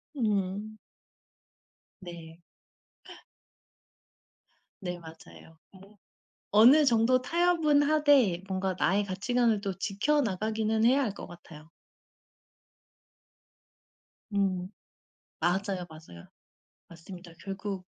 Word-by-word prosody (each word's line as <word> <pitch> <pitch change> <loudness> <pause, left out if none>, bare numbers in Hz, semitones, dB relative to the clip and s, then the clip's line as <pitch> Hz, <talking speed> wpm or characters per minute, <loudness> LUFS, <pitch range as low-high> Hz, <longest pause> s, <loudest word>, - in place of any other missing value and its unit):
음. 210 -2 -2 1.2
네. 170 -2 -11 2.4
네 180 -1 -5
맞아요. 160 0 -15
뭐 200 +2 -18 0.5
어느 250 +9 +6
정도 245 0 +3
타협은 325 -1 +2
하되 285 - +3
뭔가 190 0 -2
나의 200 +3 +1
가치관을 220 +3 0
또 195 -2 -4
지켜 230 +10 0
나가기는 220 +1 -1
해야 270 +4 +4
할 215 -6 -2
것 - - -9
같아요. 160 -3 -14 2.6
음 190 -2 -1 0.7
맞아요, 185 +1 -1
맞아요. 155 - -14 0.6
맞습니다. 175 +1 -12
결국 195 -1 -6
200 Hz, 170 characters per minute, -28 LUFS, 180-235 Hz, 2.6 s, 어느